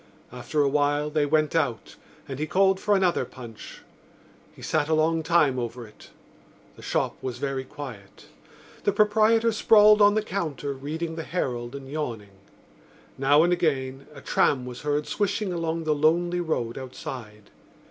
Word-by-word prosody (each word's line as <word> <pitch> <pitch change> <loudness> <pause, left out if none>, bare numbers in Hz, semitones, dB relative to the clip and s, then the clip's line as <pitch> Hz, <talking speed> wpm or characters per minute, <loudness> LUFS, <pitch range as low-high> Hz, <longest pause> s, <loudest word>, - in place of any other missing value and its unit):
After 135 +5 -1
a - - +2
while 145 +1 +1
they 150 -1 +1
went 155 +1 +1
out 140 -9 -1 0.3
and 135 -1 -6
he 155 - -2
called 190 +2 +3
for 210 0 +2
another 185 -3 +2
punch. 120 -4 -11 0.7
He - - -15
sat 145 - 0
a 160 - +3
long 160 +1 +2
time 155 -5 +2
over 120 0 -5
it. 105 -1 -16 0.7
The - - -14
shop - - -1
was 130 -2 -4
very 135 0 -3
quiet. 125 -8 -10 0.6
The 205 - +1
proprietor 220 +2 +3
sprawled 215 -1 +6
on 205 0 +6
the 215 - +1
counter 155 -8 -3
reading 160 +5 -5
the 160 - -4
Herald 125 -8 -3
and 135 -1 -8
yawning. 120 -9 -5 0.9
Now 145 +3 +5
and 175 +1 +3
again 135 -6 -1
a 140 -2 -12
tram 130 -1 +1
was 125 -1 -8
heard 150 0 -1
swishing 205 -1 -1
along 165 -1 -2
the 155 -1 +1
lonely 170 +4 +2
road 135 -8 -2
outside. 125 -5 -9
150 Hz, 160 wpm, -25 LUFS, 130-175 Hz, 0.9 s, sprawled